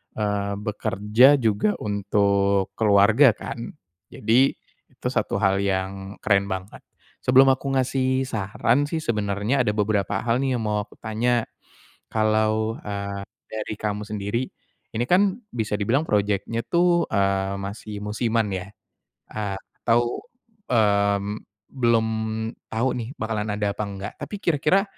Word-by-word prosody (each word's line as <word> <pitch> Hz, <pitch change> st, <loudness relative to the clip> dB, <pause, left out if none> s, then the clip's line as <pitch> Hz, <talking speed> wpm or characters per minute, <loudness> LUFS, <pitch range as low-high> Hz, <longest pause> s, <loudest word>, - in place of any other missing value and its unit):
eee, 100 Hz, -1 st, -1 dB
bekerja 105 Hz, +5 st, +3 dB
juga 105 Hz, -1 st, +2 dB
untuk 100 Hz, -1 st, +1 dB
keluarga 110 Hz, +4 st, +6 dB
kan? 115 Hz, 0 st, -7 dB, 0.4 s
Jadi, 120 Hz, +5 st, +3 dB, 0.4 s
itu 125 Hz, -, -5 dB
satu 110 Hz, -5 st, -1 dB
hal 95 Hz, -1 st, +3 dB
yang 95 Hz, 0 st, -2 dB
keren 100 Hz, -1 st, +3 dB
banget. 95 Hz, +1 st, -5 dB, 0.4 s
Sebelum 135 Hz, +1 st, +6 dB
aku 135 Hz, +1 st, -1 dB
ngasih 130 Hz, 0 st, +1 dB
saran 120 Hz, +5 st, 0 dB
sih 160 Hz, 0 st, -3 dB
sebenernya 105 Hz, +3 st, 0 dB
ada 105 Hz, -, +1 dB
beberapa 105 Hz, -2 st, 0 dB
hal 120 Hz, +1 st, +1 dB
nih 135 Hz, -2 st, 0 dB
yang 115 Hz, -, -2 dB
mau 105 Hz, -1 st, 0 dB
aku -, -, -19 dB
tanya, 115 Hz, +2 st, +1 dB, 0.7 s
kalau, 110 Hz, 0 st, +1 dB
eee, 100 Hz, -1 st, -4 dB, 0.2 s
dari 110 Hz, 0 st, -4 dB
kamu 105 Hz, -1 st, -2 dB
sendiri, 105 Hz, +4 st, -2 dB, 0.5 s
ini 120 Hz, +2 st, 0 dB
kan 195 Hz, +5 st, +3 dB
bisa 110 Hz, -3 st, -3 dB
dibilang 130 Hz, +10 st, +1 dB
project-nya 105 Hz, +1 st, 0 dB
tuh, 175 Hz, +2 st, +2 dB
eee, 100 Hz, -1 st, +1 dB
masih 100 Hz, +1 st, -6 dB
musiman 115 Hz, +1 st, 0 dB
ya, 95 Hz, 0 st, -4 dB, 0.7 s
eee, 100 Hz, -2 st, -3 dB, 0.3 s
atau, 120 Hz, +1 st, +2 dB, 0.5 s
mmm, 100 Hz, -2 st, +1 dB, 0.2 s
belum 115 Hz, -4 st, +2 dB, 0.6 s
tau 115 Hz, +4 st, +1 dB
nih 120 Hz, +1 st, -4 dB
bakalan 110 Hz, -1 st, -2 dB
ada 105 Hz, -1 st, 0 dB
apa 105 Hz, -, -2 dB
enggak 100 Hz, 0 st, -6 dB
tapi -, -, -6 dB
kira-kira, 170 Hz, +4 st, +2 dB
110 Hz, 130 wpm, -24 LUFS, 100-120 Hz, 0.7 s, keluarga